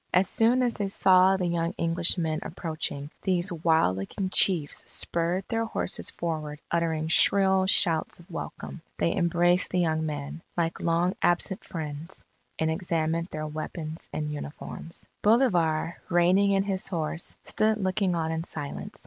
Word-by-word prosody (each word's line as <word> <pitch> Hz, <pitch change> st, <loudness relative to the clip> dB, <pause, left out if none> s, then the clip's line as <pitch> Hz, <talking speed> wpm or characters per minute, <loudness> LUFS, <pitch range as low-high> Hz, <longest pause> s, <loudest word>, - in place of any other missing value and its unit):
As 185 Hz, +1 st, +4 dB
soon 240 Hz, +3 st, +3 dB
as 240 Hz, -2 st, +1 dB
they 205 Hz, -, -2 dB
saw 190 Hz, 0 st, +5 dB
the 185 Hz, -, -1 dB
young 170 Hz, +1 st, -1 dB
Englishmen 165 Hz, -1 st, +1 dB
approaching, 155 Hz, -4 st, -4 dB
these 180 Hz, -1 st, 0 dB
wild 160 Hz, -, +2 dB
looking 185 Hz, -, -3 dB
chiefs 170 Hz, -8 st, +3 dB
spurred 170 Hz, +3 st, 0 dB
their 230 Hz, 0 st, -1 dB
horses 225 Hz, -, -3 dB
forward 155 Hz, -3 st, -4 dB
uttering 160 Hz, -2 st, 0 dB
shrill 190 Hz, +3 st, +4 dB
shouts 165 Hz, -5 st, +2 dB
of 175 Hz, +2 st, -16 dB
welcome. 165 Hz, 0 st, -7 dB, 0.2 s
They -, -, +1 dB
embraced 175 Hz, 0 st, +2 dB
the 185 Hz, -, -1 dB
young 160 Hz, -3 st, +1 dB
men, 150 Hz, +1 st, -5 dB, 0.2 s
like 165 Hz, -1 st, -1 dB
long 170 Hz, +2 st, +1 dB
absent 175 Hz, +2 st, +1 dB
friends, 155 Hz, -1 st, -7 dB, 0.3 s
and 160 Hz, 0 st, +1 dB
examined 165 Hz, -1 st, -1 dB
their 155 Hz, -4 st, -5 dB
weapons 155 Hz, +1 st, -6 dB
and 150 Hz, -1 st, -3 dB
uniforms. 150 Hz, +3 st, -7 dB, 0.2 s
Bolivar, 175 Hz, -9 st, +2 dB
reigning 180 Hz, +4 st, +4 dB
in 195 Hz, -1 st, +3 dB
his 195 Hz, -2 st, -1 dB
horse, 165 Hz, -2 st, -3 dB
stood 215 Hz, 0 st, +1 dB
looking 190 Hz, -2 st, 0 dB
on 160 Hz, -1 st, -1 dB
in 160 Hz, 0 st, -2 dB
silence. 145 Hz, -4 st, -7 dB
170 Hz, 150 wpm, -27 LUFS, 160-190 Hz, 0.3 s, saw